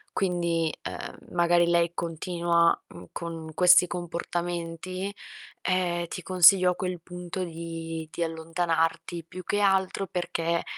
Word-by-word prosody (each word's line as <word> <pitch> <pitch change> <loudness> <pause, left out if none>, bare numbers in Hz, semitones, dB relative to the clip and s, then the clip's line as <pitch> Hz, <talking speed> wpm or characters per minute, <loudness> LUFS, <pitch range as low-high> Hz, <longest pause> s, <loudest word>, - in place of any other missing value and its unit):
quindi, 170 -4 0 0.2
uhm, - - -9
magari 175 0 +4
lei 170 -1 +3
continua, 170 0 +1
mhmm, 90 0 -12
con 165 -2 -6
questi 180 +1 +7
comportamenti, 175 +2 -4 0.5
ehm, 175 -2 0
ti 180 - -6
consiglio 185 0 +6
a 180 - -3
quel 180 -2 -4
punto 180 +1 -6
di 165 -1 -6
di 170 - -2
allontanarti, 165 0 -1
più 185 +2 -9
che 205 - 0
altro 195 -1 +2
perché, 170 -1 -1
175 Hz, 125 wpm, -27 LUFS, 165-180 Hz, 0.5 s, questi